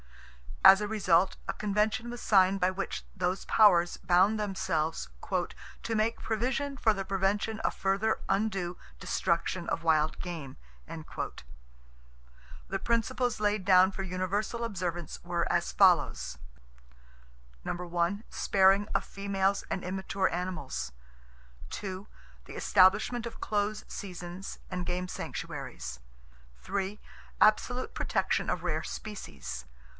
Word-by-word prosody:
As 195 +1 +9
a 210 - -1
result 190 -4 +2
a - - -1
Convention 210 +3 0
was 240 0 -6
signed 195 -1 +4
by 180 0 +3
which 195 +1 -4
those 185 0 -1
powers 175 -6 +5
bound 190 +5 +3
themselves 185 - -1 0.2
"to 225 - -3
make 220 +2 +1
provision 255 +5 -1
for 220 -4 +3
the 195 -1 -4
prevention 195 +3 0
of - - 0
further 195 +3 +1
undue 195 -3 0 0.2
destruction - - -1
of 165 - -2
wild 155 -1 +2
game." 165 -7 -6 0.3
The - - -9
principles 235 +1 0
laid 210 -1 +1
down 185 0 +6
for 195 - -5
universal 190 +5 -2
observance 175 -6 -4
were 175 -1 -1
as 65 - +1
follows: 65 +1 +3 1.9
Sparing 195 +1 +3
of - - +2
females 200 0 -1
and 185 - -2
immature 190 +1 -1
animals. 155 - -3 0.9
The 195 0 -6 0.4
establishment 210 +6 +3
of 235 - -9
close 210 0 -1
seasons 180 0 -7
and 180 -1 -3
game 180 +1 -2
sanctuaries. 60 - -6 1.4
Absolute 245 +4 +3
protection - - 0
of - - -1
rare - - -1
species. 65 - -7
190 Hz, 110 wpm, -30 LUFS, 175-210 Hz, 1.9 s, As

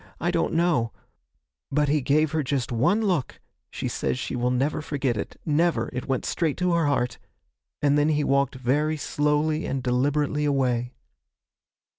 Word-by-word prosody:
I 175 - 0
don't 170 -1 0
know 160 -9 +2 0.8
but 150 +1 +2
he 150 +1 +2
gave 150 +3 +2
her 160 - +1
just 130 -2 -2
one 175 - +2
look 175 - -1 0.3
(she - - -4
says - - -1
she 130 - -4
will 125 0 0
never 135 +5 0
forget 140 -5 -1
it 105 - -6
never; 155 -6 +1
it 125 - -4
went 135 -2 -1
straight 160 -5 -1
to 180 -1 +1
her 165 -3 +2
heart), 125 -5 0 0.6
and 145 0 +4
then 145 +1 +3
he 150 -1 +1
walked 140 -1 +1
very 145 +5 0
slowly 150 +2 0
and 135 -1 -2
deliberately 145 +4 +1
away. 125 -4 0
145 Hz, 165 wpm, -25 LUFS, 130-155 Hz, 0.8 s, and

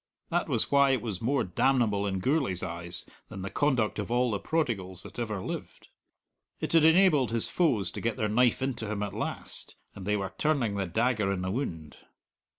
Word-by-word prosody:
That - - 0
was - - +1
why 140 -1 +5
it 135 -1 +1
was 105 -6 -3
more 135 +4 +1
damnable 105 +1 +1
in 95 -1 -2
Gourlay's 130 - 0
eyes 85 0 -2 0.2
than 95 -3 -7
the 100 - -5
conduct 130 -8 +1
of 105 - -4
all 120 0 +2
the 100 - -1
prodigals 100 - -2
that 100 +3 -10
ever 110 -4 -2
lived. - - -7 0.7
It - - -3
had 165 -2 +6
enabled 160 -5 +5
his 115 -1 +5
foes 130 - +1
to - - -6
get 115 +1 -1
their 110 -4 0
knife 120 +4 +2
into 120 -5 -3
him 105 -1 -2
at 100 - -4
last, - - -5 0.2
and 95 -1 -9
they 105 0 +2
were 95 -1 -4
turning 140 -9 +1
the 100 -2 -2
dagger 110 +1 +1
in 95 -2 -2
the 95 - -2
wound. 80 - -4
110 Hz, 200 wpm, -28 LUFS, 95-130 Hz, 0.7 s, had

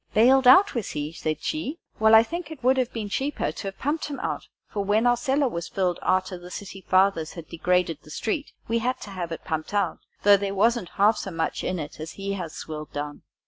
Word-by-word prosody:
"Bailed 255 +4 +6
out, 375 +11 +8
was 235 -5 -2
he?" 150 +1 -4
said 155 -2 -3
she; 310 0 -2 0.2
"well, 220 0 +7
I 220 - +8
should - - -14
think 340 -2 -4
it 315 -6 -10
would 260 +2 +5
have 255 -1 +1
been 220 -3 -4
cheaper 275 +8 -1
to 200 - -6
have 195 - -6
pumped 295 +4 -1
him 290 -2 -5
out, - - -3 0.2
for, 205 - -3
when 210 +4 +2
our 245 0 +5
cellar 270 +3 +1
was 170 -8 -4
filled, 180 -3 -1
arter 185 -1 0
the 175 0 -11
city 195 +1 -8
fathers 185 -4 +2
had 170 -2 -9
degraded 175 -2 +1
the - - -16
street, 230 - -3 0.2
we 230 +1 +1
had 255 +3 -1
to 205 - -8
have 175 -3 -4
it 165 - -6
pumped 160 +5 -3
out, 195 -5 0 0.2
though 205 0 +7
there 200 0 -3
wasn't 225 -2 +2
half 210 +2 +5
so - - -4
much 165 -2 -2
in 185 - -1
it 150 -2 -6
as 160 +1 -6
he 200 0 -4
has 175 -5 -5
swilled 155 -1 -7
down." 145 0 -5
200 Hz, 240 wpm, -25 LUFS, 170-245 Hz, 0.2 s, out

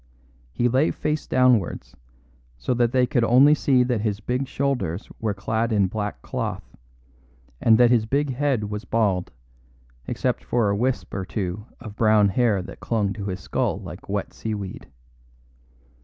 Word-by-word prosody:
He 120 - +1
lay 130 +6 +3
face 150 0 -2
downwards, 120 - +2 0.6
so - - -1
they 125 +1 +2
could 120 -1 +1
only 130 +6 +6
see 135 -4 +3
that 125 -4 -1
his 105 -2 -1
big 125 +5 -2
shoulders 125 -10 -2
were 110 -2 -1
clad 110 +3 -1
in 100 -3 +3
black 105 - -4
cloth, - - -5 0.9
and 110 -1 +5
that 120 0 +5
his 115 -3 +3
big 140 +2 0
head 135 -4 0
was 105 +1 -4
bald, 100 -6 0 0.8
except - - -1
for 115 -4 +1
a - - 0
wisp 125 +4 -1
or 95 - -2
two 100 +1 -4
of 110 -4 -9
brown 110 -2 +4
hair 105 -2 +1
that - - -10
clung 105 -4 -1
to 100 -2 -6
his 95 -2 -4
skull - - -1
like - - -10
wet - - -3
seaweed. 105 -4 -5
110 Hz, 155 wpm, -24 LUFS, 100-125 Hz, 0.9 s, only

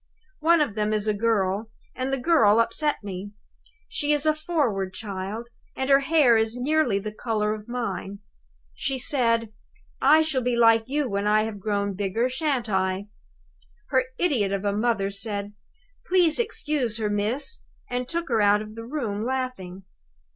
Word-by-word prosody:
One 325 +1 +4
of 285 -8 0
them 210 0 -1
is 215 0 -1
a 215 - +2
girl, 205 -1 0 0.2
and 260 +1 -3
the 270 - +1
girl 245 -7 +4
upset 260 +4 +1
me. 200 +1 -6 0.5
She 295 -1 0
is 295 0 0
a 310 - +4
forward 265 - -1
child, 205 +3 -5 0.3
and 265 +1 -1
her 275 - +7
hair 280 -4 +4
is 220 +2 0
nearly 270 -4 +1
the 210 +2 -4
color 215 -2 -1
of 215 0 -8
mine. 200 -5 -4 0.6
She 270 - -2
said, 230 -4 +1 0.5
'I 310 +3 +6
shall 300 -5 0
be 245 0 0
like 225 0 +4
you 290 0 0
when 200 -2 -1
I 215 0 +4
have 220 -2 -5
grown 200 0 -1
bigger, 205 +5 -1
shan't 260 -3 -1
I?' 190 0 -1 0.8
Her 260 -1 +2
idiot 245 - +1
of 200 0 -2
a 200 - +1
mother 210 -2 0
said, 200 0 -4 0.5
'Please 355 -4 +3
to 475 - +3
excuse 285 - -2
her, 220 -2 -1
miss,' 225 - -1 0.3
and 245 0 -3
took 340 0 -2
her 225 -3 +2
out 205 +1 +4
of 215 0 -11
the 230 +1 -8
room, 230 -7 -3
laughing. 240 -8 -4
230 Hz, 170 wpm, -25 LUFS, 205-270 Hz, 0.8 s, her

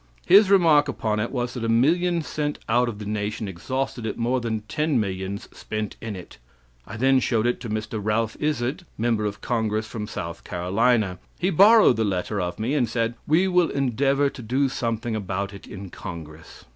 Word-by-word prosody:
His 200 +2 +7
remark 165 -7 +5
upon 110 -6 -1
it 110 - -1
was 125 -2 -2
that 125 - -5
a 115 - -1
million 165 +8 +2
sent 150 -1 -3
out 120 +2 +2
of 110 - -6
the 105 - -7
nation 105 +1 -3
exhausted 125 +7 -3
it 110 -2 -3
more 125 +2 0
than 110 -2 -2
ten 150 +5 0
millions 95 -1 -3
spent 110 -1 -4
in 115 -3 -5
it. 90 -8 -11 0.5
I - - -7
then 135 +2 +4
showed 115 -3 +1
it 120 - +1
to 120 - -6
Mr. 110 +1 -3
Ralph 110 +2 0
Izard, 150 +2 -1
member 115 -1 0
of 105 0 -4
congress 110 -2 -1
from 105 0 -6
South - - -6
Carolina. 100 +2 +1 0.2
He 185 +2 0
borrowed 205 - +6
the 110 - +2
letter 100 0 -1
of 90 -1 -3
me 115 +6 -1
and 125 -6 +1
said: 115 0 0
'We 175 +5 +3
will 180 -2 +3
endeavor 140 +1 +1
to - - -10
do 130 +4 +1
something 115 -2 -2
about 100 -1 -3
it 100 - -11
in 95 -2 -9
congress.' 80 -3 -9
115 Hz, 195 wpm, -24 LUFS, 105-135 Hz, 0.5 s, His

